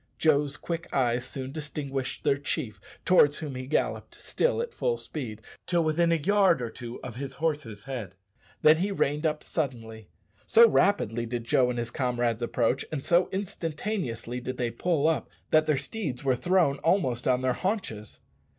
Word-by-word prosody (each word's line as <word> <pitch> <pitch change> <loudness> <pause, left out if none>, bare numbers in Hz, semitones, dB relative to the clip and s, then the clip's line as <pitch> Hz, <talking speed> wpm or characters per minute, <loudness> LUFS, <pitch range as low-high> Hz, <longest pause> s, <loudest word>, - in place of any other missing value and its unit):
Joe's 145 -2 +2
quick 170 0 -5
eye 120 -2 +2
soon 130 +1 -6
distinguished 140 -3 -4
their 140 -2 +2
chief, 125 - -3 0.2
towards 150 -6 +5
whom 150 -3 -5
he 130 0 -6
galloped, 155 - -2
still 485 0 0
at 470 0 -3
full 480 -1 0
speed, 110 -8 -7 0.2
till 175 -2 +2
within 165 +2 +2
a - - +4
yard 190 0 +3
or 120 -2 -4
two 120 -1 -8
of 115 -1 -7
his 135 0 -5
horse's 145 -10 -2
head; 120 -9 -6 0.5
then 155 +1 +7
he 195 +4 0
reined 150 -4 +1
up 150 -1 -2
suddenly. 115 - -4 0.4
So 230 +1 +8
rapidly 120 - +2
did 120 0 -3
Joe 125 +2 +3
and 125 - -2
his 120 0 -3
comrades 120 -3 0
approach, 120 +2 +1
and 145 -4 -4
so 175 +1 +3
instantaneously 165 - -3
did 130 +1 -5
they 120 -2 -1
pull 155 +4 +1
up, 165 - 0 0.2
that 155 0 +4
their 155 -2 +3
steeds 140 - -4
were 130 -2 +2
thrown 175 -2 +2
almost 145 -8 +1
on 130 0 +2
their 130 -1 +2
haunches. 185 - -4
140 Hz, 175 wpm, -27 LUFS, 120-165 Hz, 0.5 s, So